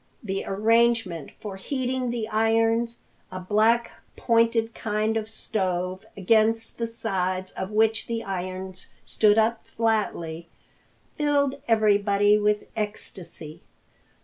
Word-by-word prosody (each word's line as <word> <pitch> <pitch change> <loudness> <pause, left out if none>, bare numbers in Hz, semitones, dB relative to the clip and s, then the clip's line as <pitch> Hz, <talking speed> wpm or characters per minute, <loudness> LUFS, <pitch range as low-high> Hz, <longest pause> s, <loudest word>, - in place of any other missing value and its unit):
The 195 -2 -3
arrangement 220 -5 +2
for 200 -3 -7
heating 255 +3 -2
the 235 -2 -2
irons, 225 +1 +2 0.3
a 185 - -5
black, 215 +5 +2 0.2
pointed 230 -1 +2
kind 215 +1 -1
of 220 -1 -2
stove 185 -4 -2
against 225 +4 +2
the 230 - -1
sides 185 -5 -2
of 190 - -5
which 220 +1 +1
the 230 -1 -3
irons 185 0 -5 0.2
stood 210 -1 +3
up 225 +1 +2
flatly, 170 -8 -2 0.7
filled 285 -2 +1
everybody 205 -2 +3
with 210 0 +1
ecstasy. 190 -7 -6
215 Hz, 110 wpm, -25 LUFS, 190-230 Hz, 0.7 s, stood